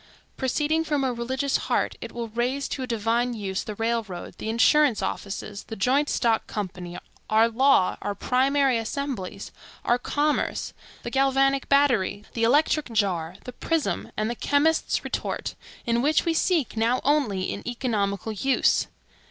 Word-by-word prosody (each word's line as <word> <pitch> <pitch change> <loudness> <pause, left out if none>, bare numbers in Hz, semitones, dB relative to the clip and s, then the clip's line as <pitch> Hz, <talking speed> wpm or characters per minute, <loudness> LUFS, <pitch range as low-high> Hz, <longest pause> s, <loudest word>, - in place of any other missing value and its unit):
Proceeding 300 +5 0
from 295 -3 0
a 260 -2 0
religious 260 +4 -1
heart - - -1
it - - -6
will 235 -1 -5
raise 250 +5 -1
to 270 - -4
a 255 - -3
divine 235 +1 0
use 195 -3 -3
the 215 - -6
railroad, 225 -5 -2
the 220 - -4
insurance 250 +2 +4
office, 200 +1 -4
the 225 - -6
joint 270 +8 +2
stock 230 -2 +1
company; 180 -4 -5 0.3
our 220 +1 +5
law, 240 -4 +3
our 205 0 -3
primary 265 0 +2
assemblies, 235 -4 -4 0.3
our 240 +1 +3
commerce, 295 +4 -1 0.3
the 240 - -5
galvanic 270 0 +2
battery, 245 -8 +2
the 230 - -3
electric 290 +3 +3
jar, 185 -6 0
the 250 - -8
prism, 325 +3 -1
and 215 - 0
the 235 - -1
chemist's 295 +6 +1
retort; - - -3 0.3
in 235 0 +1
which 305 +4 +2
we 335 - +2
seek 325 -6 +1
now 230 +3 +2
only 245 -11 +1
an - - -6
economical 220 -5 -1
use. 250 +5 +2
240 Hz, 150 wpm, -25 LUFS, 215-275 Hz, 0.3 s, our